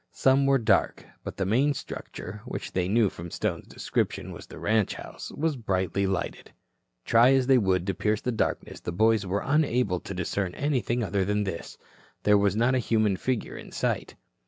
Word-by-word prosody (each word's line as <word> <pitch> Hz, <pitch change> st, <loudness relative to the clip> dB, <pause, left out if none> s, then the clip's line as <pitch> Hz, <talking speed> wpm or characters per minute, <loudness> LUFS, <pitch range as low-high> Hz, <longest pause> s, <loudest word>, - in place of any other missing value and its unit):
Some 135 Hz, +1 st, +3 dB
were 135 Hz, 0 st, +5 dB
dark. 115 Hz, -4 st, +1 dB, 0.2 s
But -, -, -7 dB
the 95 Hz, -, 0 dB
main 135 Hz, +9 st, +2 dB
structure, 105 Hz, -5 st, -7 dB
which 130 Hz, -, -5 dB
they 90 Hz, -1 st, 0 dB
knew 110 Hz, +2 st, +3 dB
from 85 Hz, -2 st, -7 dB
Stone's -, -, -3 dB
description -, -, -2 dB
was -, -, -10 dB
the -, -, -11 dB
ranch 110 Hz, -1 st, +1 dB
house, -, -, -8 dB
was 155 Hz, 0 st, -1 dB
brightly 95 Hz, -4 st, 0 dB
lighted. 95 Hz, -2 st, -3 dB, 0.5 s
Try 120 Hz, +3 st, +6 dB
as 135 Hz, -1 st, +3 dB
they 130 Hz, -1 st, +5 dB
would 95 Hz, -4 st, +1 dB
to 95 Hz, -, 0 dB
pierce 105 Hz, +3 st, 0 dB
the 125 Hz, -, -1 dB
darkness, 115 Hz, -, -2 dB
the -, -, -5 dB
boys 110 Hz, +2 st, +2 dB
were 100 Hz, +3 st, -1 dB
unable 125 Hz, -, +2 dB
to 100 Hz, -, -7 dB
discern 90 Hz, 0 st, -2 dB
anything 125 Hz, -4 st, 0 dB
other 100 Hz, -1 st, 0 dB
than 105 Hz, +2 st, 0 dB
this. 95 Hz, -4 st, -5 dB, 0.5 s
There 105 Hz, -, +5 dB
was 100 Hz, -1 st, +2 dB
not 120 Hz, +4 st, +3 dB
a 130 Hz, -, +2 dB
human 110 Hz, -4 st, +2 dB
figure 125 Hz, +4 st, -2 dB
in -, -, -10 dB
sight. -, -, -2 dB
105 Hz, 190 wpm, -27 LUFS, 95-125 Hz, 0.5 s, Try